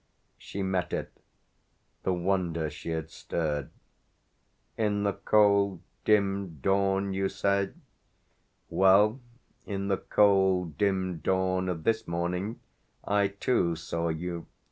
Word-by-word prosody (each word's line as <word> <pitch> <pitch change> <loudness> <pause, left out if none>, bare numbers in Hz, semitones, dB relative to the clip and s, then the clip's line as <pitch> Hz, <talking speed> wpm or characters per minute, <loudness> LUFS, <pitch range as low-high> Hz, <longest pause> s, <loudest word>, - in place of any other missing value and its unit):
She 100 - -5
met 95 -2 -1
it, - - -3 0.9
the 95 - 0
wonder 85 -3 0
she 75 +2 -8
had 80 -1 -3
stirred. 75 -5 -3 1.1
"In 105 -2 0
the 100 -1 +1
cold 100 -3 +3 0.2
dim 100 -5 +1
dawn, 95 +4 +1
you 95 0 0
say? 100 +1 0 0.9
Well, 100 +5 +4 0.5
in 100 -1 -3
the 95 - +2
cold 95 -5 +3
dim 95 -4 0
dawn 95 +2 0
of 85 -3 -3
this 110 0 0
morning 90 +5 -2 0.4
I 100 -1 +2
too 100 -3 0
saw 85 +1 -3
you." 85 +1 -4
95 Hz, 115 wpm, -28 LUFS, 85-100 Hz, 1.1 s, Well